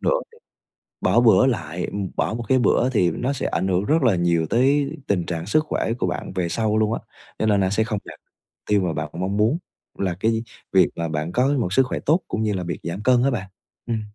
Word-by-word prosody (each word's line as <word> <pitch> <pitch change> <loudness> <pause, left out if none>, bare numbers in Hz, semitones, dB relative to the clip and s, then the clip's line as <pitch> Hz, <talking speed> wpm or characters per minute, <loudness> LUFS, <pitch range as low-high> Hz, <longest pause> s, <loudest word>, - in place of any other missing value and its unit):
nữa - - +1 0.2
thì 460 - -19 0.6
bỏ - - +3
bữa 120 +2 +6
lại 90 -9 -2 0.3
bỏ - - 0
một 120 +1 -4
cái 130 -1 +4
bữa 120 +1 +3
thì 95 -9 +2
nó 130 +3 -2
sẽ 140 - -4
ảnh 95 - -1
hưởng 95 +1 +1
rất 155 0 +2
là 115 -6 +4
nhiều 85 -2 +1
tới 140 +3 +2 0.2
tình 90 -4 0
trạng 85 -1 -4
sức 155 +11 +2
khỏe 115 - -1
của - - 0
bạn 90 - -4
về 90 -2 -1
sau 110 +1 0
luôn 110 0 +2
á, - - -2 0.4
cho - - +1
nên 105 -2 +3
là 95 - +2
sẽ 105 +3 +1
không 110 -2 -2
đạt - - -11 0.5
tiêu 105 -1 +3
mà 90 -3 -1
bạn 75 0 -3
mong 95 +3 -2
muốn 110 +9 +3 0.4
là 95 -3 -1
cái 115 +2 +1 0.3
việc - - +5
mà 85 0 -2
bạn 75 +2 -3
có 125 +6 +2
một 90 -5 -1
sức 135 - +5
khỏe - - -3
tốt 160 +5 +2
cũng - - -2
như 105 -1 0
là 95 -2 -2
việc 85 0 -4
giảm 85 +4 -4
cân 125 +1 +4
á 140 - +2
bạn. 95 -6 -4 0.4
Ừm. 115 -2 -2
105 Hz, 245 wpm, -23 LUFS, 90-120 Hz, 0.6 s, bữa